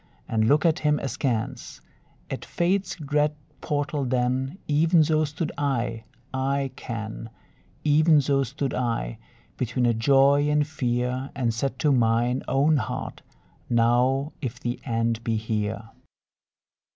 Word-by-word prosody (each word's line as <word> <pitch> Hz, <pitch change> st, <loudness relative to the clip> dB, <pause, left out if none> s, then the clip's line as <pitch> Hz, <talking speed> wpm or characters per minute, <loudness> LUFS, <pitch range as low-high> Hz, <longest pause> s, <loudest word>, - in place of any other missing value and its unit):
and 110 Hz, -1 st, +1 dB
look 150 Hz, +6 st, +3 dB
at 165 Hz, -2 st, +3 dB
him 150 Hz, -1 st, +2 dB
askance: 125 Hz, -4 st, -3 dB, 0.5 s
At -, -, -4 dB
Fate's 185 Hz, +2 st, 0 dB
dread 150 Hz, -1 st, 0 dB, 0.3 s
portal 145 Hz, 0 st, -1 dB
then 130 Hz, +4 st, 0 dB
Even 160 Hz, +3 st, +4 dB
so 155 Hz, 0 st, +2 dB
stood 150 Hz, +2 st, -4 dB
I, 120 Hz, -5 st, -1 dB, 0.3 s
I 135 Hz, +1 st, 0 dB
ken, 115 Hz, -1 st, -6 dB, 0.5 s
Even 155 Hz, +1 st, +5 dB
so 140 Hz, 0 st, +2 dB
stood 135 Hz, +2 st, -3 dB
I, 115 Hz, -, -2 dB, 0.4 s
between 125 Hz, 0 st, 0 dB
a 120 Hz, -, +3 dB
joy 140 Hz, +5 st, +4 dB
and 150 Hz, 0 st, +2 dB
fear, 125 Hz, -2 st, -2 dB
And 120 Hz, -4 st, 0 dB
said 130 Hz, +3 st, -2 dB
to 145 Hz, +2 st, +2 dB
mine 120 Hz, 0 st, +2 dB
own 145 Hz, +3 st, +3 dB
heart, 110 Hz, -, -4 dB, 0.5 s
"Now 125 Hz, +5 st, +2 dB
if 125 Hz, -3 st, -4 dB
the 120 Hz, 0 st, -3 dB
end 115 Hz, -2 st, -1 dB
be 115 Hz, -1 st, 0 dB
here!" 110 Hz, 0 st, -3 dB
130 Hz, 130 wpm, -25 LUFS, 115-150 Hz, 0.5 s, Even